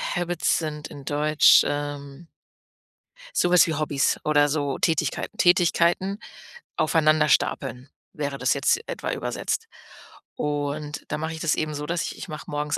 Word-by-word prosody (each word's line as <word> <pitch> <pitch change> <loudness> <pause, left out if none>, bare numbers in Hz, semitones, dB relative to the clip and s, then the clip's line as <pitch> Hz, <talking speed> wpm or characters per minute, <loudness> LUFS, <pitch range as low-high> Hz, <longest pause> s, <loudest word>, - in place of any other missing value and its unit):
Habits 175 0 0
sind 150 -2 -5
in 140 -2 -11
Deutsch, 150 +1 +5
ähm 145 +1 -5 1.1
so 175 - +3
was 180 0 +6
wie 160 - -1
Hobbys 145 -2 0
oder 145 -1 +3
so 145 -2 -1
Tätigkeiten. 160 -3 -1
Tätigkeiten 175 +2 +2 0.6
aufeinander 155 -1 +3
stapeln, 130 -1 0 0.2
wäre 140 -2 -4
das 125 -1 +1
jetzt - - +1
etwa - - -4
übersetzt. - - -3 0.7
Und 145 0 -3
da 150 - -2
mache 160 +1 -4
ich 160 - -8
das 160 - +1
eben 155 -1 -2
so, 150 +1 -4
dass 170 +2 -2
ich - - -6
ich - - -8
mache 155 -1 -8
morgens 150 0 -2
150 Hz, 150 wpm, -24 LUFS, 145-160 Hz, 1.1 s, was